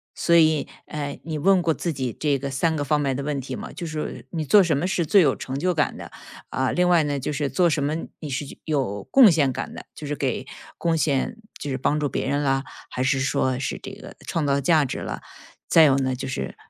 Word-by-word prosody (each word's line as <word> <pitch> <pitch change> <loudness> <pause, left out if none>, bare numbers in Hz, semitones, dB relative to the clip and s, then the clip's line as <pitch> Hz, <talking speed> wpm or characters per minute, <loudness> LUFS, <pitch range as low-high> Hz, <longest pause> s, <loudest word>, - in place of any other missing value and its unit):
所 170 - +2
以， 155 -2 +4 0.2
呃， 145 -2 -5
你 155 -1 -4
问 190 +2 +4
过 160 - +2
自 170 - -3
己 130 -5 -3
这 145 -3 +1
个 140 +1 -5
3 160 +4 +1
个 145 - -1
方 150 +1 +1
面 135 -2 0
的 140 - -3
问 145 -2 -2
题 130 0 -6
吗？ - - -7
就 170 - -6
是 155 - -7
说， 140 -5 -4
你 160 -2 -3
做 205 +7 +7
什 160 -6 +2
么 165 - -1
是 180 -3 0
最 195 +4 +5
有 140 -5 +3
成 130 +1 -5
就 180 +4 +1
感 155 -5 0
的？ - - -9 0.4
啊， 130 -1 0
另 180 0 +2
外 170 -3 +4
呢， 145 -1 -1
就 145 - -3
是 145 -1 -1
做 180 -2 +3
什 145 -2 0
么 150 +2 0 0.2
你 150 - -6
是 135 +2 -3 0.2
有 130 -10 -1
贡 250 -8 +7
献 145 -5 +2
感 - - -5
的， - - -9
就 150 - -8
是 145 +1 -2
给 130 -1 -2 0.3
贡 165 -1 +1
献 155 - 0 0.2
就 145 - -5
是 130 - -1
帮 150 +3 0
助 145 - 0
别 - - -2
人 145 +1 0
了， 135 0 +1 0.3
还 125 - -3
是 135 +1 +2
说 130 -1 0
是 135 - -3
这 - - -7
个 - - -11
创 160 -3 -1
造 140 0 +1
价 155 0 +3
值 - - -4
了。 - - -5 0.5
再 165 - +6
有 140 -2 +5
呢 130 -1 0
就 135 +1 -5
是， 65 - -4
145 Hz, 270 characters per minute, -24 LUFS, 135-160 Hz, 0.5 s, 做